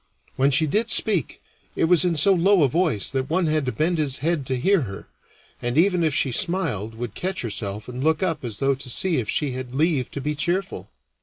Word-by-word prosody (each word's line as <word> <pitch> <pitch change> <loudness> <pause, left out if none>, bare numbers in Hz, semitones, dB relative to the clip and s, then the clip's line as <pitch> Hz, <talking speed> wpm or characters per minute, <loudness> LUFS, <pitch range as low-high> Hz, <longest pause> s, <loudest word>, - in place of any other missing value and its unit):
When 135 +1 +3
she 150 +3 +3
did 215 +10 0
speak, 195 - +1 0.3
it - - 0
was 170 +1 +4
in 175 -2 +1
so 175 +6 +5
low 190 0 +4
a - - +5
voice 155 - +1
that 135 -1 -2
one 175 +2 +1
had 155 -3 0
to - - +1
bend 165 +4 0
his 140 -3 -1
head 155 -3 -1
to 130 -1 -1
hear 190 +6 +3
her, 100 -6 -7 0.5
and 120 +3 -2
even 180 0 +3
if 155 -3 +1
she 135 -4 +1
smiled 115 - -1
would 115 -2 -5
catch 185 +3 -3
herself 105 -2 -4
and 125 +1 -5
look 160 +2 +1
up 165 -5 -1
as 115 -4 -5
though 135 +3 +1
to 135 -1 -6
see 175 +7 +1
if 115 -5 -2
she 145 -3 0
had 130 0 -6
leave 150 -3 +1
to - - -6
be 150 +2 -2
cheerful. 185 +6 -2
150 Hz, 230 wpm, -23 LUFS, 125-175 Hz, 0.5 s, so